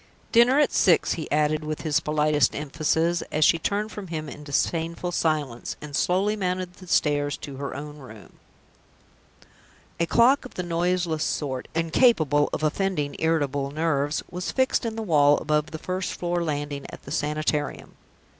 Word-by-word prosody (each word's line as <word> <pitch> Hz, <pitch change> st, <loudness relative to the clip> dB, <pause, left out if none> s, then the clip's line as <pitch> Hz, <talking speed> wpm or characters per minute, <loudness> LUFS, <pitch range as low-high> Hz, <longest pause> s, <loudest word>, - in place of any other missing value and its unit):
"Dinner 240 Hz, +3 st, +5 dB
at 295 Hz, -, +3 dB
six," 175 Hz, -3 st, +3 dB
he 160 Hz, -, -5 dB
added, 150 Hz, +1 st, +1 dB
with 155 Hz, 0 st, -4 dB
his 155 Hz, -1 st, +1 dB
politest 150 Hz, -4 st, +2 dB
emphasis, 160 Hz, +3 st, 0 dB
as 155 Hz, 0 st, +3 dB
she 165 Hz, -, +4 dB
turned 205 Hz, +5 st, -1 dB
from 205 Hz, -2 st, -7 dB
him 155 Hz, -2 st, -4 dB
in 150 Hz, 0 st, -9 dB
disdainful 165 Hz, +4 st, -1 dB
silence, 150 Hz, -8 st, -1 dB
and 150 Hz, -1 st, -7 dB
slowly 195 Hz, +7 st, +1 dB
mounted 185 Hz, -2 st, -2 dB
the 185 Hz, 0 st, -14 dB
stairs 145 Hz, -3 st, +1 dB
to 140 Hz, -2 st, -8 dB
her 140 Hz, 0 st, -5 dB
own 150 Hz, +1 st, -7 dB
room. 110 Hz, -7 st, -13 dB, 1.6 s
A 170 Hz, -, +1 dB
clock 245 Hz, -, +4 dB
of 255 Hz, -, -11 dB
the 180 Hz, -, -3 dB
noiseless 175 Hz, -1 st, 0 dB
sort 130 Hz, -4 st, -2 dB
incapable 165 Hz, -, +3 dB
of -, -, -3 dB
offending 155 Hz, -2 st, -1 dB
irritable 145 Hz, -4 st, 0 dB
nerves 145 Hz, -1 st, 0 dB
was 180 Hz, 0 st, -4 dB
fixed 260 Hz, -2 st, +1 dB
in 225 Hz, -, -4 dB
the 225 Hz, -, -3 dB
wall, 145 Hz, -6 st, +4 dB
above 150 Hz, 0 st, 0 dB
the 160 Hz, -, -6 dB
first 185 Hz, +3 st, -3 dB
floor 175 Hz, 0 st, -1 dB
landing, 145 Hz, -2 st, -3 dB
at -, -, -11 dB
the 140 Hz, -, -10 dB
Sanitarium. 150 Hz, -1 st, -2 dB
155 Hz, 165 wpm, -25 LUFS, 145-180 Hz, 1.6 s, Dinner